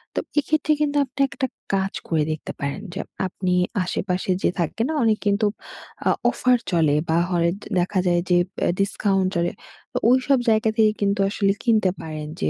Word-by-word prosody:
তো - - +1 0.2
এক্ষেত্রে 305 +1 0
কিন্তু 290 -1 +1
আপনি 275 - -16
একটা 270 0 -2 0.3
কাজ 195 0 0
করে 160 -2 +1
দেখতে 155 - -5
পারেন। 140 0 -3
যে 190 - -5 0.3
আপনি 185 0 -2 0.3
আশেপাশে 185 +1 -2
যে - - +4
থাকে 170 +6 -1
না 315 - -2
অনেক 220 -2 +3
কিন্তু 205 +1 +2 0.6
আ - - +5 0.2
অফার 250 0 +3
চলে 160 -4 +3
বা 160 - +3
হরে 170 -2 +2 0.3
দেখা 185 +2 0
যায় 175 -1 +3
যে, 180 - +5 0.3
এ - - +2
ডিসকাউন্ট 195 -1 +1
চলে, 170 0 +1 0.4
ও - - +2
ওইসব 260 +2 +4
জায়গা 220 0 +3
থেকে 215 -1 +5
কিন্তু 200 0 +1
আসলে 200 -1 +1
কিনতে 220 -5 +3
পারেন। 155 -1 -6
যে 80 - 0
195 Hz, 180 wpm, -23 LUFS, 175-225 Hz, 0.6 s, আ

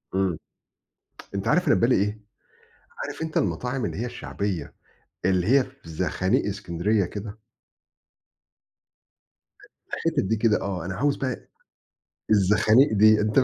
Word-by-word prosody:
أمم. 95 -4 +1 1.0
أنت 95 - -2
عارف 180 0 +2
أنا - - +6
في - - 0
بالي 120 +2 +4
إيه؟ 105 +2 -1 0.8
عارف - - -6
أنت 160 -1 -2
المطاعم 120 +7 -1
اللي - - -4
هي 120 - -2
الشعبية، 100 -6 -4 0.5
اللي 95 0 +2
هي 135 +1 +5
في 130 -10 -15
زخانيق 95 - 0
اسكندرية 100 0 0
كده؟ 105 +3 -7 2.5
الحتت - - 0
دي 105 +4 0
كده 110 -1 +2
آه، 90 -4 -3
أنا 95 - -4
عاوز 145 +1 +1
بقى 130 -3 -4 0.8
الزخانيق 110 +6 +5
دي. 110 +1 +5
أنت 110 +5 +3
ف - - +4
105 Hz, 135 wpm, -25 LUFS, 95-125 Hz, 2.5 s, أنا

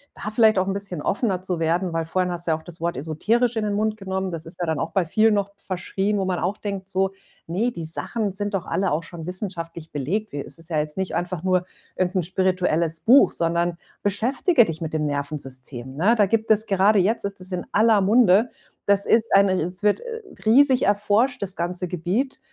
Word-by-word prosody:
da 215 - -5
vielleicht 220 -2 +5
auch 185 - +2
'n 195 - -1
bisschen 190 -6 -5
offener 195 -4 0
zu 180 -3 -1
werden, 170 +2 0
weil 165 0 -1
vorhin 180 +1 0
hast 175 0 -4
du - - +2
ja 160 - +2
auch 160 - -15
das 170 -1 -11
Wort 170 -3 -1
esoterisch 220 - 0
in 220 - 0
den 205 - -1
Mund 215 +1 0
genommen. 190 -2 -3
Das 165 -1 -6
ist 170 - -11
ja 175 - -1
dann 160 -2 -1
auch 165 - -2
bei 190 -3 0
vielen 215 +6 +3
noch 200 0 -1
verschrien, 195 +2 -2
wo 195 - 0
man 185 -1 -1
auch 190 +4 -1
denkt 195 -2 -5
so: 190 0 0 0.3
„Ne, 195 +9 0
die 170 -7 -6
Sachen 205 +6 -2
sind 205 +1 -3
doch 185 -2 -3
alle 195 -1 0
auch 155 +3 0
schon 165 0 -9
wissenschaftlich 170 -4 -5
belegt. 185 +10 -2
Wi 145 - -3
es - - -10
ist 165 +1 -9
ja 155 - +1
jetzt 150 +2 -3
nicht 190 -1 -2
einfach 175 -1 -3
nur 185 -1 +1 0.3
irgend 185 +1 -1
'n 185 - +2
spirituelles 180 -3 0
Buch, 260 +5 +6
sondern 170 +1 +1 0.2
beschäftige 240 - +2
dich 165 -4 -5
mit 160 -1 -4
dem 155 - 0
Nervensystem.“, 135 -3 -5
ne? 195 +10 +3
Da 210 -3 +4
gibt 220 +3 0
es 220 0 +4
gerade 200 +1 +3
jetzt 205 +5 +2
ist 200 -1 -4
das 185 +1 -10
in 180 -1 -4
aller 220 -1 +4
Munde. 215 +2 +4 0.4
Das 200 0 +3
ist 230 0 +2
ein 200 0 +6
es 180 +2 -2
wird, 210 -1 +3
äh, 460 -2 -7 0.2
riesig 260 +3 +5
erforscht 210 +5 +2
das 190 -1 -2
ganze 175 +1 -2
Gebiet. 185 - -2
185 Hz, 225 wpm, -23 LUFS, 170-210 Hz, 0.4 s, Buch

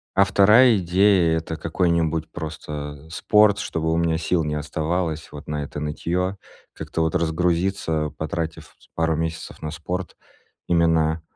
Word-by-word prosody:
А 100 - +6
вторая 105 +5 +6
идея- 90 -2 +3
это 80 0 -5
какой-нибудь 85 -1 0
просто, 75 -3 -6
э, - - -18
спорт, 105 +4 +3
чтобы 80 0 -2
у 80 - +1
меня 85 -1 +1
сил 85 0 0
не 75 0 -2
оставалось 80 +2 -2
вот 75 -1 -10
на 75 -1 -3
это 75 +1 -6
нытьё, 90 +5 -2 0.4
как-то 80 -1 -2
разгрузиться, 85 -1 0
потратив 80 +1 -4 0.2
пару 80 -1 +1
с - - -4
месяцев 80 0 -5
на 75 - -4
спорт. 90 +3 -5 0.5
Именно, 80 -2 +2
80 Hz, 145 wpm, -23 LUFS, 80-90 Hz, 0.5 s, А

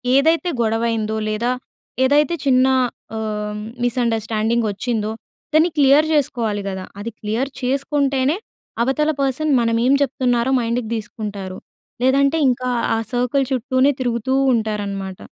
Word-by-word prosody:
ఏదైతే 325 +5 +3
గొడవ 225 0 +1
అయ్యిందో 220 -1 -1
లేదా 235 +3 0 0.5
ఏదైతే 290 +4 +3
చిన్న 255 -1 +4 0.5
ఆహ్, 210 -1 -3 0.3
మిస్ 245 +1 0
అండర్‌స్టాండింగ్ 225 0 0
వచ్చిందో 215 +1 -2 0.4
దాన్ని 315 +3 +5
క్లియర్ 285 +2 +5
చేసుకోవాలి 230 -8 0
గదా! 190 -1 -5
అది 230 +3 -5
క్లియర్ 225 +6 -2
చేసుకుంటేనే 275 +2 +1 0.5
అవతల 285 +5 +1
పర్సన్ 275 +3 0
మనం 230 0 +1
ఏం 270 - +4
చెప్తున్నారో 255 -2 +1
మైండ్‍కి 235 -1 -2
తీసుకుంటారు. 205 -4 -6 0.5
లేదంటే 275 +4 +3
ఇంకా 250 +1 -1 0.3
ఆ - - 0
సర్కిల్ 250 +3 +1
చుట్టూనే 260 +2 +2
తిరుగుతూ 240 0 -1 0.2
ఉంటారనమాట. 200 -4 -2
245 Hz, 120 wpm, -20 LUFS, 220-275 Hz, 0.5 s, దాన్ని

